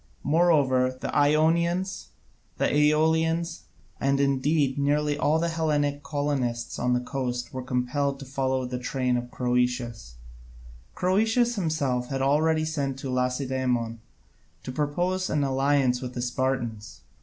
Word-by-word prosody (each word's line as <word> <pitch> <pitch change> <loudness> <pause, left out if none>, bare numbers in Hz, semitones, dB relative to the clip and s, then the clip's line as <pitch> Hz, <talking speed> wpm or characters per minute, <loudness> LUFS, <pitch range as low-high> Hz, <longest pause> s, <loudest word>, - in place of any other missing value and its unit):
Moreover, 145 -5 +3
the - - -4
Ionians, 170 +5 +2 0.5
and - - +2
Aeolians, 160 +3 +2 0.3
and 140 0 +1
indeed 140 0 +1
nearly 145 +1 +1
all 150 +2 +2
the 170 +1 0
Hellenic 150 -3 0
colonists 140 -5 -2
on 125 0 +1
the 125 - +2
coast 125 -1 -4
were 130 - -4
compelled 130 +3 -1
to 140 - -9
follow 130 -1 -1
in 125 - -5
the 125 0 -3
train 125 0 -1
of 120 0 -3
Croesus. 125 - -1 0.8
Croesus 225 +6 +2
himself 145 - -1
had 135 0 -2
already 155 +3 +2
sent 140 -4 -2
to 135 -1 -5
Lacedaemon 125 -2 -1 0.6
to - - -5
propose 175 +7 -1
an 150 -2 +1
alliance 135 -2 +2
with 125 -1 -6
the 120 - -2
Spartans. 120 -4 -3
140 Hz, 130 wpm, -26 LUFS, 125-155 Hz, 0.8 s, Moreover